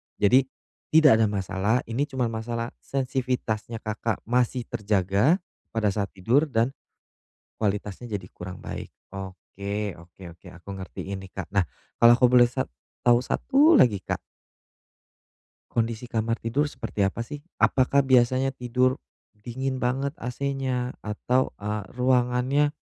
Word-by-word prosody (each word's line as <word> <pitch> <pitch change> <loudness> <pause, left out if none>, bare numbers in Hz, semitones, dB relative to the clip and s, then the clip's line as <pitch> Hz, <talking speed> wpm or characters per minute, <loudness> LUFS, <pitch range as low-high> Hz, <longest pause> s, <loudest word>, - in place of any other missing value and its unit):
Jadi 130 +6 +4 0.5
tidak 150 -8 +7
ada 110 - +4
masalah, 100 +4 0
ini 125 +6 -2
cuman 130 -5 -1
masalah 115 +1 -3
sensivitasnya 125 -4 -2
Kakak 110 0 -2
masih 125 +1 +1
terjaga 105 - +1 0.3
pada 105 -2 +2
saat 100 0 -1
tidur 120 +11 +2
dan 120 -2 +1 0.9
kualitasnya 105 +2 -2
jadi 95 -3 -6
kurang 90 +1 -9
baik. - - -7 0.2
Oke 100 +2 -5
oke 85 +3 -16 0.2
oke, - - -15
aku 90 +3 -14
ngertiin 95 0 -6
nih, 95 -1 -11
Kak. 95 -5 -6
Nah 95 -4 +2 0.3
kalau 120 0 +8
aku 125 0 +4
boleh 120 -1 +7
sa 120 - -2 0.4
tahu 120 -1 +5
satu 285 - +4
lagi 115 - +5
Kak - - -3 1.5
Kondisi 115 0 -2
kamar 115 0 0
tidur 130 +6 +1
seperti 105 -8 -2
apa, 95 +4 -3
sih? 145 +5 -7 0.2
Apakah 140 +1 +4
biasanya 130 0 +3
tidur, 130 0 0 0.4
dingin 130 +4 -3
banget 130 +3 0
AC-nya, 130 -2 -2
atau, 120 +5 -1
eee, 105 -1 -3
ruangannya. 125 +3 +2
120 Hz, 130 wpm, -26 LUFS, 105-130 Hz, 1.5 s, kalau